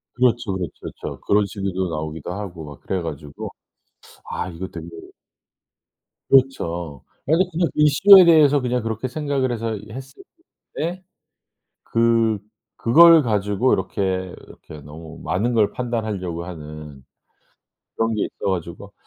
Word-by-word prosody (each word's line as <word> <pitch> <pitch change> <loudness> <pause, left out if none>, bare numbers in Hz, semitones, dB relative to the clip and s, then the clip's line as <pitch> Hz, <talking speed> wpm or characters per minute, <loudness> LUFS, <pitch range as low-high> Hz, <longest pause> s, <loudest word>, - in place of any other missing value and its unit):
그렇죠, 120 -4 +1
그렇죠, 90 -3 -3
그쵸. - - -8
그런 100 0 +3
식으로 95 -2 -3
나오기도 80 +1 -5
하고 90 -5 -7
막 75 -1 -11
그래 95 - -3
가지고 75 -2 -7 0.8
'아 95 - -3
이거 90 +2 -6
되게' 85 0 -9 1.4
그렇죠. 85 - +1 0.2
아 150 - 0
이게 180 +4 +4
그냥 170 0 0
이슈에 180 +6 +7
대해서 150 -4 +5
그냥 125 -1 -1
그렇게 115 +3 -3
생각을 140 -2 -1
해서 115 -2 -3
했을 135 +3 -10 0.5
뿐인데 175 +4 -3 0.8
그 115 -2 +2 0.4
그걸 165 +6 +7
가지고 105 +1 +1
이렇게, 95 -2 -1
이렇게 75 - -13
너무 80 +2 -11
많은 105 +9 0
걸 105 -3 +2
판단하려고 105 -8 -3
하는 75 -5 -10 0.9
그런 115 0 0
게 105 - 0
있어 100 - -4
가지고 95 +3 -6
105 Hz, 285 characters per minute, -22 LUFS, 85-130 Hz, 1.4 s, 이슈에